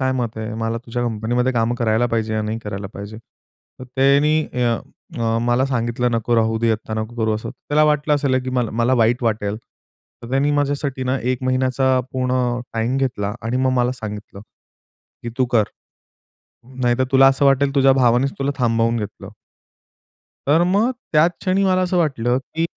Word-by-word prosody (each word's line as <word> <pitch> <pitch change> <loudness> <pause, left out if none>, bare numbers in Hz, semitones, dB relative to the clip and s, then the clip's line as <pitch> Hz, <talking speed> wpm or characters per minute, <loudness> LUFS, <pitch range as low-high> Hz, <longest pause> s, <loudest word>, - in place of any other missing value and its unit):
काय 130 0 +1
मत 120 -4 -3
आहे? 110 0 -4
मला 115 +1 -2
तुझ्या 120 +1 -4
कंपनीमध्ये 120 +3 0
काम 115 -1 +1
करायला 115 0 +1
पाहिजे 110 -2 -1
या 110 - 0
नाही 110 +1 -3
करायला 100 -1 -5
पाहिजे?" 100 +2 -8
तर 115 +2 -18
त्यांनी 145 +3 +3 0.8
अ 115 0 +1
मला 120 +2 +2
सांगितलं 120 -1 -1
"नको 115 +1 0
राहू 110 0 +1
दे, 115 0 +1
आत्ता 110 0 -4
नको 110 +2 -4
करू." 110 -2 0
असं 110 - -5
तर - - -10 0.2
त्याला 150 +1 +4
वाटलं 150 0 +2
असेल 140 -3 +1
की 130 - -3
मला, 125 -3 -1
मला 120 +3 +1
वाईट 120 +3 +1
वाटेल. 105 -2 -1 0.7
तर 115 - -9
त्यांनी 135 +2 +2
माझ्यासाठी 140 -2 -1
ना 130 +1 0
1 130 - -5
महिन्याचा 130 0 +1
पूर्ण 125 -1 0
टाईम 115 +3 0
घेतला 115 -7 -1
आणि 115 +2 -2
मग 130 0 +2
मला 125 +1 +1
सांगितलं 105 -4 -8 0.8
की 120 - -5
"तू 130 - +4
कर. 110 -2 +5 1.2
नाहीतर 120 +1 +2
तुला 135 0 +7
असं 135 +1 +1
वाटेल 140 +1 +3
तुझ्या 135 -1 +5
भावानेच 130 +1 +2
तुला 140 +1 0
थांबवून 115 -1 +1
घेतलं." 105 -2 -7 1.2
तर 155 +5 +4
मग 220 +5 +3 0.2
त्याच 155 +3 +5
क्षणी 190 +1 +1
मला 185 -1 +2
असं 180 0 0
वाटलं, 130 -7 +1 0.2
की 165 - -1
125 Hz, 175 wpm, -20 LUFS, 115-135 Hz, 1.2 s, तुला